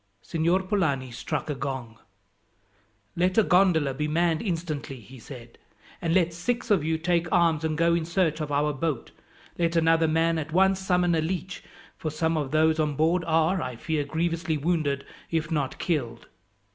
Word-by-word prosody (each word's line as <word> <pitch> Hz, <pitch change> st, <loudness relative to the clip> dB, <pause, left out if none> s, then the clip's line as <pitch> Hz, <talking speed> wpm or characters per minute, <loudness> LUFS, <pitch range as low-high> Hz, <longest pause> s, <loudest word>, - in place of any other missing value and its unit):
Signor 170 Hz, +3 st, +1 dB
Polani 155 Hz, -, 0 dB
struck 125 Hz, +5 st, -4 dB
a 150 Hz, -, -1 dB
gong. 130 Hz, -5 st, -5 dB, 1.2 s
"Let 180 Hz, +3 st, +1 dB
a 220 Hz, -, +6 dB
gondola 175 Hz, -8 st, +3 dB
be 150 Hz, +3 st, -2 dB
manned 165 Hz, +1 st, +1 dB
instantly," 165 Hz, -, -4 dB
he 125 Hz, +4 st, -13 dB
said, 120 Hz, -1 st, -12 dB, 0.4 s
"and 165 Hz, -, -1 dB
let 170 Hz, -3 st, +2 dB
six 235 Hz, +7 st, -2 dB
of 190 Hz, -7 st, +4 dB
you 160 Hz, +1 st, 0 dB
take 170 Hz, 0 st, 0 dB
arms 165 Hz, -3 st, +3 dB
and 155 Hz, -1 st, -1 dB
go 170 Hz, +1 st, +3 dB
in 170 Hz, -1 st, 0 dB
search 165 Hz, -2 st, 0 dB
of 150 Hz, -1 st, -4 dB
our 145 Hz, +1 st, +1 dB
boat. 145 Hz, -3 st, -3 dB, 0.5 s
Let 170 Hz, 0 st, +1 dB
another 165 Hz, 0 st, +3 dB
man 165 Hz, +1 st, +2 dB
at 155 Hz, 0 st, -5 dB
once 190 Hz, +2 st, +3 dB
summon 180 Hz, -2 st, +1 dB
a 160 Hz, -, +2 dB
leech, 180 Hz, +2 st, -4 dB, 0.3 s
for 155 Hz, -, -3 dB
some 160 Hz, +2 st, 0 dB
of 145 Hz, -4 st, -1 dB
those 155 Hz, +2 st, +2 dB
on 150 Hz, -2 st, 0 dB
board 165 Hz, +4 st, +2 dB
are, 165 Hz, +3 st, +2 dB
I 125 Hz, -1 st, -4 dB
fear, 155 Hz, +4 st, -2 dB
grievously 165 Hz, +2 st, -1 dB
wounded, 145 Hz, -3 st, -1 dB, 0.2 s
if 165 Hz, 0 st, -1 dB
not 140 Hz, -4 st, -1 dB
killed." 120 Hz, -9 st, -2 dB
160 Hz, 175 wpm, -26 LUFS, 150-170 Hz, 1.2 s, a